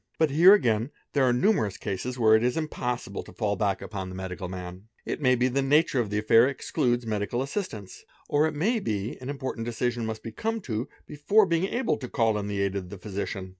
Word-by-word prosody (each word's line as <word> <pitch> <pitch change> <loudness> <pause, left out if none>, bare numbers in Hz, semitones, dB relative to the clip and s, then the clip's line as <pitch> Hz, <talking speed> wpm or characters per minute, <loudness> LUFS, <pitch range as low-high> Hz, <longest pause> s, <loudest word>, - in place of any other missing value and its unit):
i - - -45
But 160 -3 +2
here 175 +8 +8
again 115 - +1 0.2
there 140 -2 +3
are 125 - +4
numerous 125 - +1
cases 110 +6 -4
where 110 -2 +5
it 110 - +5
is 125 +5 +1
impossible 125 -9 -3
fall 105 -3 0
back 100 0 -1
upon 95 -3 -5
the 90 - -8
medical 95 -1 -5
man; 90 +2 -8 0.2
it - - -4
may 130 -2 +4
be 125 +1 +2
the 135 +2 0
nature 145 0 +3
of 115 -4 -1
the 105 +1 0
aif 115 +4 +6
excludes 120 -3 -1
medical 110 +3 -1
assistance 135 - -6 0.2
or, 150 +2 +3
it 155 - -4
may 220 +10 +1
be, 105 - -3
an 130 - -6
important 130 -5 -4
decision 120 -1 -2
m 110 - -2
be 115 - -6
come 225 - -2
to 115 - -4 0.2
before 195 +9 +3
being 170 0 +1
able 240 +5 0
to 125 - -7
call 115 -2 +1
in 100 - -4
the 100 -1 -2
aid 100 0 -1
of 95 -2 -4
the 100 - -8
physician. 95 0 -5
120 Hz, 225 wpm, -27 LUFS, 100-145 Hz, 0.2 s, here